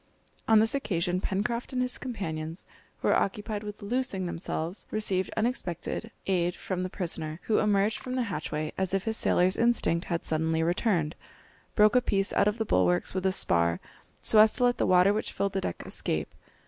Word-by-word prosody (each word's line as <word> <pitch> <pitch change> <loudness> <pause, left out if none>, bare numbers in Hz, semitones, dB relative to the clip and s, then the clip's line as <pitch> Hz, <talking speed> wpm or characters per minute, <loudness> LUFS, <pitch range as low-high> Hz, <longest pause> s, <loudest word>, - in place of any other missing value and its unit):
On 220 - +6
this 220 +1 +4
occasion 180 -9 -1
Pencroft 235 +8 -2
and 255 - -1
his 250 -1 -2
companions, 165 - -4 0.3
who - - -3
were - - +4
occupied 210 +1 -1
with 210 -1 -8
loosing 230 -3 -1
themselves, 170 +1 -4
received 195 -3 0
unexpected 220 -2 -2 0.2
aid 180 -2 +1
from 185 -1 -4
the 185 - -2
prisoner, 160 -4 -3
who 220 - +2
emerged 210 0 +2
from 255 0 -5
the 255 - +1
hatchway 155 -6 -3
as 190 0 0
if 195 - -1
his 225 0 -1
sailor's 185 -3 +2
instinct 230 -8 +2
had 170 -2 -3
suddenly 160 +1 0
returned, 175 -2 0 0.6
broke 215 +2 +5
a 250 - +6
piece 195 -4 0
out 200 - +3
of 210 +1 0
the 220 - -1
bulwarks 90 - +2
with 190 0 0
a - - +2
spar 85 - +1 0.4
so 215 - +4
as 215 0 +7
to - - +1
let 245 0 +2
the - - +2
water 185 +2 +5
which 215 - -2
filled 200 0 -1
the 195 - -1
deck 85 - -4
escape. 75 -2 -2
195 Hz, 190 wpm, -28 LUFS, 170-220 Hz, 0.6 s, as